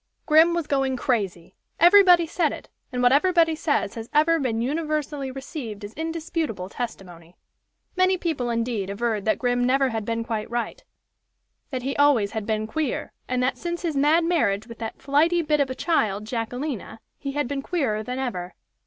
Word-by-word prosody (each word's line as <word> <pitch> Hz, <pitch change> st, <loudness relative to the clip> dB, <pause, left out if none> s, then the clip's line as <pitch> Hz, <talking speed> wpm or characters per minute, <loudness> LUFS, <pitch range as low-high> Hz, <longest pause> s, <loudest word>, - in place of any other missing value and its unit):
Grim 320 Hz, +2 st, +5 dB
was 340 Hz, -2 st, -1 dB
going 270 Hz, -2 st, 0 dB
crazy! 200 Hz, -10 st, -2 dB, 0.3 s
Everybody 355 Hz, -1 st, +7 dB
said 325 Hz, -1 st, 0 dB
it, -, -, -9 dB, 0.2 s
and 250 Hz, -1 st, -1 dB
what 245 Hz, -, +6 dB
everybody 330 Hz, +2 st, +4 dB
says 300 Hz, -9 st, 0 dB
has 225 Hz, 0 st, -7 dB
ever 325 Hz, +2 st, +4 dB
been 240 Hz, -5 st, -1 dB
universally 295 Hz, +1 st, -2 dB
received 260 Hz, -5 st, -7 dB
as 205 Hz, -, -10 dB
indisputable 320 Hz, -, -3 dB
testimony. 180 Hz, -8 st, -7 dB, 0.6 s
Many 370 Hz, 0 st, +3 dB
people, 310 Hz, -9 st, -2 dB
indeed, 230 Hz, -4 st, -1 dB
averred 215 Hz, 0 st, -2 dB
that 215 Hz, -, +2 dB
Grim 245 Hz, -1 st, +1 dB
never 265 Hz, +2 st, +3 dB
had 225 Hz, -2 st, -3 dB
been 230 Hz, +1 st, -2 dB
quite 225 Hz, -2 st, -3 dB
right 235 Hz, 0 st, -3 dB, 0.9 s
that 255 Hz, -3 st, -4 dB
he 270 Hz, +1 st, -2 dB
always 275 Hz, -8 st, +4 dB
had 220 Hz, -2 st, -4 dB
been 215 Hz, -1 st, 0 dB
queer, 300 Hz, +4 st, -3 dB, 0.2 s
and 250 Hz, 0 st, 0 dB
that 255 Hz, -, 0 dB
since 345 Hz, 0 st, -4 dB
his 325 Hz, -4 st, -1 dB
mad 300 Hz, +4 st, +4 dB
marriage 220 Hz, -, +1 dB
with 230 Hz, -1 st, -11 dB
that 225 Hz, -1 st, -6 dB
flighty 325 Hz, +5 st, +2 dB
bit 300 Hz, -1 st, +1 dB
of 280 Hz, -2 st, +2 dB
a 260 Hz, -, -4 dB
child, 215 Hz, -, 0 dB
Jacquelina, 240 Hz, +1 st, -4 dB, 0.2 s
he 275 Hz, -1 st, -4 dB
had 290 Hz, -2 st, -1 dB
been 280 Hz, +1 st, -3 dB
queerer 270 Hz, -10 st, -1 dB
than 250 Hz, +4 st, -5 dB
ever. 185 Hz, -9 st, -4 dB
260 Hz, 180 wpm, -24 LUFS, 225-310 Hz, 0.9 s, Everybody